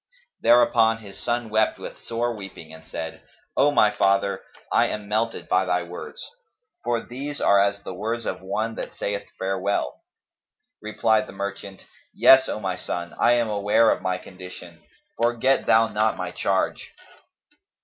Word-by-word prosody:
Thereupon 115 Hz, -2 st, +5 dB
his 100 Hz, -3 st, -12 dB
son 120 Hz, -2 st, -2 dB
wept 110 Hz, 0 st, +2 dB
with -, -, -9 dB
sore 120 Hz, 0 st, -2 dB
weeping 95 Hz, -6 st, -10 dB
and 80 Hz, 0 st, -12 dB
said, 80 Hz, 0 st, -6 dB, 0.3 s
"O 145 Hz, -, +4 dB
my 110 Hz, -7 st, +4 dB
father, 100 Hz, -1 st, +1 dB, 0.3 s
I -, -, +4 dB
am 105 Hz, -1 st, -5 dB
melted 110 Hz, +2 st, -1 dB
by 90 Hz, +1 st, +3 dB
thy 90 Hz, -1 st, 0 dB
words, 90 Hz, -, -8 dB, 0.6 s
for 115 Hz, -1 st, -1 dB
these 140 Hz, +4 st, -6 dB
are 100 Hz, 0 st, +5 dB
as 100 Hz, 0 st, -1 dB
the -, -, -6 dB
words 115 Hz, +5 st, -3 dB
of 90 Hz, -, -3 dB
one 110 Hz, +4 st, -2 dB
that -, -, -7 dB
saith 100 Hz, 0 st, -3 dB
farewell." 95 Hz, -7 st, -2 dB, 0.8 s
Replied 110 Hz, 0 st, +1 dB
the -, -, -10 dB
merchant, 100 Hz, 0 st, -6 dB, 0.3 s
"Yes, 130 Hz, 0 st, +7 dB
O -, -, -3 dB
my 95 Hz, -3 st, -3 dB
son, 85 Hz, -1 st, -5 dB
I 120 Hz, -, +5 dB
am 120 Hz, -1 st, +2 dB
aware 105 Hz, +2 st, +3 dB
of -, -, -1 dB
my 95 Hz, -1 st, -1 dB
condition: 90 Hz, -2 st, -11 dB, 0.4 s
forget 120 Hz, +3 st, +2 dB
thou 115 Hz, 0 st, +5 dB
not 110 Hz, +1 st, +1 dB
my -, -, -4 dB
charge." -, -, -1 dB
105 Hz, 160 wpm, -24 LUFS, 95-115 Hz, 0.8 s, Yes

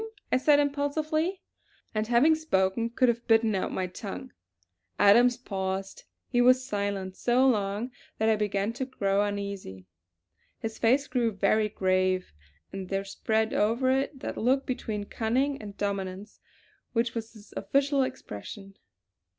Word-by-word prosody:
I -, -, +4 dB
said 290 Hz, +2 st, +4 dB
impulsively; 305 Hz, +5 st, 0 dB, 0.5 s
and 215 Hz, 0 st, -1 dB
having 245 Hz, +7 st, +5 dB
spoken 230 Hz, -8 st, 0 dB
could 250 Hz, +2 st, +2 dB
have 235 Hz, 0 st, 0 dB
bitten 225 Hz, -1 st, +4 dB
out 190 Hz, -, -1 dB
my 185 Hz, -, -1 dB
tongue. 95 Hz, -, -7 dB, 0.7 s
Adams 240 Hz, +4 st, +6 dB
paused; 195 Hz, -4 st, -4 dB, 0.2 s
he 245 Hz, -1 st, +2 dB
was 255 Hz, +1 st, +5 dB
silent 200 Hz, -5 st, -3 dB
so 250 Hz, +5 st, +3 dB
long 210 Hz, 0 st, 0 dB, 0.3 s
that 220 Hz, -, +1 dB
I 220 Hz, -, +4 dB
began 205 Hz, 0 st, -1 dB
to 260 Hz, +2 st, -3 dB
grow 200 Hz, -6 st, 0 dB
uneasy. 200 Hz, -, -5 dB, 0.7 s
His 220 Hz, 0 st, -6 dB
face 260 Hz, +5 st, +3 dB
grew 245 Hz, -4 st, 0 dB
very 215 Hz, +1 st, +2 dB
grave, 185 Hz, -, 0 dB, 0.4 s
and 190 Hz, -2 st, -6 dB
there 195 Hz, 0 st, -1 dB
spread 220 Hz, +3 st, 0 dB
over 235 Hz, +5 st, +2 dB
it 270 Hz, +1 st, -1 dB
that -, -, -5 dB
look 265 Hz, +4 st, +2 dB
between 220 Hz, -5 st, -3 dB
cunning 255 Hz, +6 st, -1 dB
and 205 Hz, -2 st, -9 dB
dominance 200 Hz, 0 st, -4 dB, 0.5 s
which 230 Hz, 0 st, +1 dB
was 230 Hz, -1 st, -5 dB
his 215 Hz, -2 st, -15 dB
official 280 Hz, 0 st, +1 dB
expression. 195 Hz, -, -6 dB
220 Hz, 140 wpm, -28 LUFS, 195-255 Hz, 0.7 s, Adams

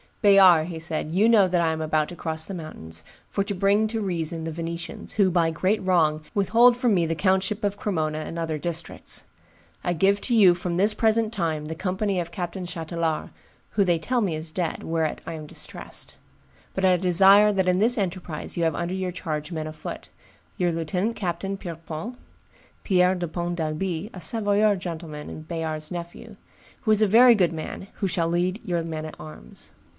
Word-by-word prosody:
"Bayard," 180 Hz, -5 st, +6 dB
said 160 Hz, -2 st, 0 dB
he, 170 Hz, +4 st, -2 dB
"you 220 Hz, +2 st, +5 dB
know 210 Hz, -5 st, +6 dB
that 175 Hz, -1 st, +1 dB
I 165 Hz, -1 st, +2 dB
am 160 Hz, 0 st, -3 dB
about 155 Hz, -1 st, +1 dB
to 175 Hz, -, -8 dB
cross 160 Hz, -1 st, -2 dB
the 195 Hz, -, -7 dB
mountains, 80 Hz, -, -6 dB, 0.3 s
for 200 Hz, -, 0 dB
to 200 Hz, +1 st, -3 dB
bring 200 Hz, +3 st, +3 dB
to 225 Hz, 0 st, -3 dB
reason 170 Hz, -4 st, -1 dB
the 165 Hz, -, -3 dB
Venetians, 165 Hz, +1 st, -5 dB
who 200 Hz, -3 st, +3 dB
by 170 Hz, -2 st, +2 dB
great 185 Hz, +6 st, 0 dB
wrong 160 Hz, -5 st, +2 dB
withhold 230 Hz, +5 st, +5 dB
from 245 Hz, -3 st, +2 dB
me 175 Hz, -3 st, +2 dB
the 165 Hz, -, -1 dB
countship 190 Hz, +4 st, +1 dB
of 205 Hz, 0 st, 0 dB
Cremona 155 Hz, -7 st, -1 dB
and 165 Hz, +2 st, -6 dB
other 160 Hz, -2 st, -2 dB
districts. 170 Hz, +1 st, -2 dB, 0.6 s
I 175 Hz, -, 0 dB
give 195 Hz, +4 st, +3 dB
to 240 Hz, -, +1 dB
you 195 Hz, -5 st, +7 dB
from 175 Hz, 0 st, -3 dB
this 205 Hz, +3 st, +3 dB
present 220 Hz, -1 st, +2 dB
time 160 Hz, -6 st, -1 dB
the 160 Hz, +1 st, -5 dB
company 190 Hz, +2 st, -1 dB
of 170 Hz, -1 st, -4 dB
Captain 180 Hz, +1 st, -4 dB
Chatelard, 165 Hz, -2 st, -3 dB, 0.4 s
who 200 Hz, -, +2 dB
they 175 Hz, -3 st, +2 dB
tell 245 Hz, +8 st, 0 dB
me 185 Hz, -7 st, 0 dB
is 155 Hz, +1 st, -3 dB
dead, 170 Hz, 0 st, -3 dB
whereat 160 Hz, -1 st, -1 dB
I -, -, -4 dB
am 155 Hz, -1 st, -7 dB
distressed; -, -, -8 dB, 0.6 s
but 190 Hz, -, +1 dB
I 185 Hz, -1 st, +5 dB
desire 195 Hz, +4 st, +6 dB
that 190 Hz, -2 st, +1 dB
in 180 Hz, 0 st, +3 dB
this 235 Hz, +4 st, +3 dB
enterprise 180 Hz, -6 st, -4 dB
you 170 Hz, -, +1 dB
have 165 Hz, -, +1 dB
under 175 Hz, +2 st, -2 dB
your 185 Hz, -1 st, -2 dB
charge 155 Hz, -3 st, -4 dB
men 160 Hz, -2 st, -3 dB
afoot; 155 Hz, -, -8 dB, 0.5 s
your 175 Hz, -1 st, +1 dB
lieutenant 180 Hz, +7 st, -1 dB
captain, 195 Hz, +1 st, -3 dB
Pierrepont 165 Hz, +4 st, -7 dB, 0.7 s
[Pierre 185 Hz, -1 st, +3 dB
de 175 Hz, -1 st, -3 dB
Pont 175 Hz, +1 st, -3 dB
d'Albi, 165 Hz, +3 st, -3 dB
a 180 Hz, -, -8 dB
Savoyard 205 Hz, +2 st, +2 dB
gentle 170 Hz, -2 st, -6 dB
man, 150 Hz, -1 st, -7 dB
and 155 Hz, 0 st, -9 dB
Bayard's 160 Hz, -2 st, -4 dB
nephew], 170 Hz, -1 st, -8 dB, 0.4 s
who 220 Hz, -, +1 dB
is 215 Hz, 0 st, +4 dB
a -, -, +4 dB
very 240 Hz, +4 st, +7 dB
good 180 Hz, -5 st, +2 dB
man, 160 Hz, +4 st, -6 dB, 0.2 s
shall 170 Hz, -2 st, 0 dB
lead 180 Hz, +4 st, 0 dB
your 170 Hz, -2 st, -1 dB
men 160 Hz, -1 st, -5 dB
at 155 Hz, -, -8 dB
arms." 110 Hz, -, -9 dB
175 Hz, 195 wpm, -25 LUFS, 160-195 Hz, 0.7 s, you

